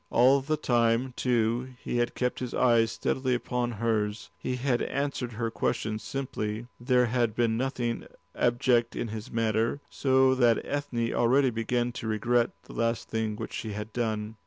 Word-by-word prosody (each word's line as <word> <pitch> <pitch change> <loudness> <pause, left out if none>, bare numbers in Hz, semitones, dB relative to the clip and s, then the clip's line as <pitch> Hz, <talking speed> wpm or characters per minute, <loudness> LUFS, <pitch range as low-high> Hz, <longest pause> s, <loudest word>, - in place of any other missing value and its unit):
All 130 +3 +5
the 155 +3 -1
time, 120 0 +2
too, 120 +1 0
he - - -2
had 120 0 0
kept 125 -1 -1
his 125 -2 -4
eyes 115 -2 +4
steadily 130 -1 0
upon 120 0 -2
hers, 105 -1 -1
he 130 - -3
had 125 -1 0
answered 140 -3 -2
her 115 0 -2
questions 110 -1 -1
simply, 115 -5 -4
there 125 0 +3
had 120 -2 0
been 115 -2 +2
nothing 125 -1 -2 0.3
abject 120 -1 +2
in 115 - -3
his 110 0 -6
manner; 115 +3 0
so 130 -1 +3
that 120 -3 +4
Ethne 125 -5 -2
already 130 +2 +3
began 120 +2 0
to 115 - -6
regret 115 +2 +2
this - - -12
last 115 0 -1
thing 110 -1 -1
which - - -6
she 110 -2 -4
had 105 +1 -6
done. 110 -2 -2
120 Hz, 165 wpm, -28 LUFS, 115-125 Hz, 0.3 s, All